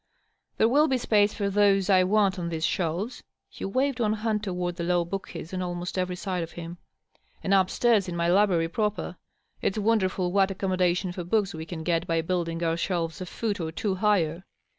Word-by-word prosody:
There 220 Hz, -, +4 dB
will 290 Hz, +6 st, +4 dB
be 265 Hz, -3 st, +1 dB
space 210 Hz, -4 st, +3 dB
for 200 Hz, -2 st, -1 dB
those 195 Hz, -1 st, +3 dB
I 190 Hz, -2 st, +5 dB
want 200 Hz, -1 st, +2 dB
on 170 Hz, -1 st, -3 dB
these 165 Hz, -1 st, -1 dB
shelves" 180 Hz, +7 st, -2 dB, 0.3 s
(he -, -, -6 dB
waved 260 Hz, +6 st, 0 dB
one 215 Hz, -2 st, +2 dB
hand 215 Hz, -1 st, -1 dB
toward 180 Hz, -3 st, -3 dB
the 170 Hz, -, -3 dB
low 175 Hz, 0 st, +1 dB
bookcases 190 Hz, -2 st, -6 dB
on 185 Hz, -, -2 dB
almost 175 Hz, 0 st, -4 dB
every 180 Hz, -1 st, -1 dB
side 180 Hz, -1 st, -3 dB
of 165 Hz, -, -6 dB
him) 170 Hz, 0 st, -8 dB, 0.3 s
" -, -, -36 dB
and 195 Hz, -, +1 dB
up 190 Hz, -1 st, +4 dB
stairs 225 Hz, -6 st, +2 dB
in 175 Hz, -, -4 dB
my 170 Hz, 0 st, 0 dB
library 180 Hz, -2 st, +3 dB
proper. 210 Hz, +4 st, -2 dB, 0.5 s
It's 195 Hz, -, 0 dB
wonderful 195 Hz, -4 st, +1 dB
what 195 Hz, 0 st, +3 dB
accommodation 185 Hz, -1 st, 0 dB
for 180 Hz, 0 st, -5 dB
books 200 Hz, +2 st, 0 dB
we 160 Hz, 0 st, -7 dB
caa 160 Hz, -2 st, -6 dB
get 170 Hz, +1 st, 0 dB
by 165 Hz, -1 st, +1 dB
building 170 Hz, -1 st, -2 dB
our 165 Hz, 0 st, +1 dB
shelves 170 Hz, -1 st, -2 dB
a 185 Hz, -, -5 dB
foot 205 Hz, +1 st, -3 dB
or 160 Hz, -2 st, -3 dB
two 195 Hz, +4 st, -1 dB
higher. 185 Hz, -4 st, +1 dB
185 Hz, 205 wpm, -27 LUFS, 170-205 Hz, 0.5 s, I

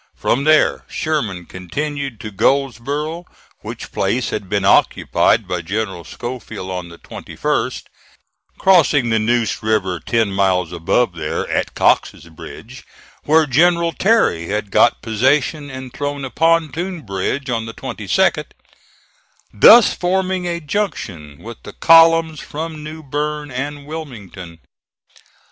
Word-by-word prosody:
From 135 Hz, +4 st, 0 dB
there 155 Hz, 0 st, +3 dB
Sherman 110 Hz, -, -3 dB
continued 135 Hz, -, -5 dB
to 110 Hz, -, -7 dB
Goldsboro', 140 Hz, -, -1 dB, 0.3 s
which -, -, -8 dB
place 125 Hz, +1 st, -1 dB
had 100 Hz, -3 st, -5 dB
been 100 Hz, -1 st, 0 dB
occupied -, -, +3 dB
by 90 Hz, -1 st, -2 dB
General 95 Hz, 0 st, -4 dB
Schofield 110 Hz, -1 st, -7 dB
on 90 Hz, -2 st, -5 dB
the 85 Hz, -, -13 dB
21st -, -, -3 dB, 0.7 s
(crossing 150 Hz, -10 st, +3 dB
the 110 Hz, -, +2 dB
Neuse 115 Hz, +1 st, 0 dB
River 100 Hz, -5 st, 0 dB
ten 115 Hz, 0 st, 0 dB
miles 95 Hz, -3 st, +1 dB
above 90 Hz, +5 st, 0 dB
there, 80 Hz, -2 st, -3 dB
at -, -, -2 dB
Cox's -, -, +1 dB
Bridge, 115 Hz, +9 st, -11 dB, 0.4 s
where 160 Hz, +1 st, +4 dB
General 170 Hz, +4 st, +3 dB
Terry 190 Hz, -, +1 dB
had 105 Hz, 0 st, -3 dB
got 120 Hz, -, +3 dB
possession 135 Hz, +6 st, 0 dB
and 130 Hz, -2 st, -8 dB
thrown 145 Hz, -1 st, -4 dB
a 130 Hz, -, -7 dB
pontoon 165 Hz, +2 st, 0 dB
bridge 120 Hz, +6 st, -3 dB
on 115 Hz, -1 st, -2 dB
the 115 Hz, -, -7 dB
22d), -, -, 0 dB, 1.1 s
thus 225 Hz, -, +7 dB
forming 185 Hz, 0 st, -1 dB
a 170 Hz, -1 st, -2 dB
junction 105 Hz, -, -4 dB
with 115 Hz, +1 st, -10 dB
the -, -, -11 dB
columns 165 Hz, -1 st, +5 dB
from 155 Hz, 0 st, -6 dB
New 155 Hz, +1 st, -8 dB
Bern 150 Hz, +1 st, -3 dB
and 140 Hz, +3 st, -5 dB
Wilmington. 105 Hz, -, -9 dB
130 Hz, 125 wpm, -18 LUFS, 100-155 Hz, 1.1 s, thus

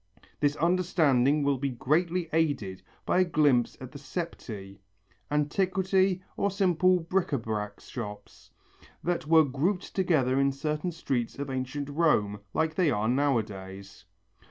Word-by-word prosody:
This 145 Hz, 0 st, +2 dB
understanding 155 Hz, -5 st, +2 dB
will 140 Hz, -2 st, +1 dB
be 140 Hz, +1 st, -1 dB
greatly 165 Hz, +8 st, 0 dB
aided 145 Hz, -, 0 dB, 0.2 s
by -, -, +2 dB
a -, -, +6 dB
glimpse 145 Hz, -8 st, +2 dB
at 130 Hz, -1 st, -9 dB
the 145 Hz, -, -9 dB
septæ, 110 Hz, -, -6 dB, 0.5 s
antiquity 185 Hz, +5 st, +1 dB
or 200 Hz, -, +1 dB
simple 185 Hz, -2 st, +2 dB
bric 180 Hz, +2 st, 0 dB
à 140 Hz, -, -1 dB
brac 105 Hz, -2 st, -4 dB
shops, 105 Hz, -4 st, -9 dB, 0.5 s
that 170 Hz, -2 st, -1 dB
were 160 Hz, -1 st, +6 dB
grouped 165 Hz, +8 st, -1 dB
together 145 Hz, -9 st, +2 dB
in 140 Hz, 0 st, +3 dB
certain 150 Hz, +5 st, -2 dB
streets 130 Hz, -8 st, -3 dB
of 140 Hz, -1 st, -4 dB
ancient 130 Hz, +2 st, -3 dB
Rome 140 Hz, -10 st, +1 dB
like 160 Hz, 0 st, 0 dB
they 170 Hz, -1 st, +2 dB
are 105 Hz, -4 st, 0 dB
nowadays. 100 Hz, -8 st, -2 dB
145 Hz, 135 wpm, -28 LUFS, 125-175 Hz, 0.5 s, a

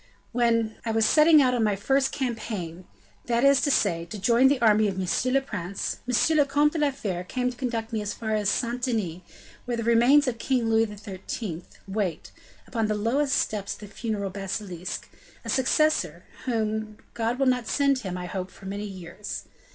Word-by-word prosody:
When 230 Hz, -2 st, +1 dB
I 230 Hz, -, -3 dB
was 225 Hz, 0 st, +2 dB
setting 305 Hz, +1 st, +6 dB
out 250 Hz, -1 st, +3 dB
on 240 Hz, -2 st, +1 dB
my 210 Hz, -2 st, +2 dB
first 270 Hz, +6 st, +1 dB
campaign, 215 Hz, -9 st, -4 dB, 0.4 s
that 235 Hz, +1 st, +1 dB
is 275 Hz, -2 st, +5 dB
to 285 Hz, -, +1 dB
say, 175 Hz, -10 st, +2 dB
to 190 Hz, +5 st, -7 dB
join 235 Hz, +6 st, +4 dB
the 275 Hz, -1 st, +2 dB
army 215 Hz, -2 st, +4 dB
of 195 Hz, -2 st, -3 dB
monsieur 190 Hz, +7 st, 0 dB
le 275 Hz, +1 st, +3 dB
prince, 200 Hz, -7 st, -4 dB
M. 310 Hz, +6 st, +3 dB
le 295 Hz, -, +6 dB
Comte 290 Hz, +2 st, +2 dB
de 325 Hz, -, -2 dB
la 295 Hz, -1 st, +3 dB
Fere 195 Hz, -10 st, -4 dB
came 250 Hz, +6 st, -1 dB
to -, -, -12 dB
conduct 235 Hz, -3 st, -3 dB
me 220 Hz, -, 0 dB
as 205 Hz, 0 st, -3 dB
far 220 Hz, -1 st, -3 dB
as 210 Hz, -2 st, +1 dB
Saint 240 Hz, +3 st, -1 dB
Denis, 210 Hz, -9 st, -1 dB, 0.4 s
where 240 Hz, -1 st, -2 dB
the 230 Hz, -, -2 dB
remains 240 Hz, +6 st, +5 dB
of 235 Hz, -2 st, -2 dB
King 240 Hz, -3 st, 0 dB
Louis 225 Hz, 0 st, +4 dB
XIII. 200 Hz, -3 st, -6 dB, 0.2 s
wait, 195 Hz, -4 st, -3 dB, 0.3 s
upon 225 Hz, -3 st, -1 dB
the 215 Hz, -, 0 dB
lowest 260 Hz, +7 st, +1 dB
steps 205 Hz, -2 st, -1 dB
of -, -, -17 dB
the 205 Hz, -, -8 dB
funeral 205 Hz, -2 st, -3 dB
basilique, 190 Hz, -2 st, -5 dB, 0.4 s
a -, -, -5 dB
successor, 305 Hz, +4 st, +2 dB, 0.2 s
whom 220 Hz, -3 st, -2 dB, 0.2 s
God 230 Hz, +1 st, -1 dB
will 270 Hz, -, +2 dB
not 250 Hz, -3 st, +1 dB
send 280 Hz, -2 st, +2 dB
him, 185 Hz, -6 st, -5 dB
I 180 Hz, -, -5 dB
hope, 185 Hz, +1 st, -4 dB
for 195 Hz, -, -15 dB
many 200 Hz, +2 st, -4 dB
years. 185 Hz, +1 st, -7 dB
225 Hz, 200 wpm, -26 LUFS, 200-255 Hz, 0.4 s, setting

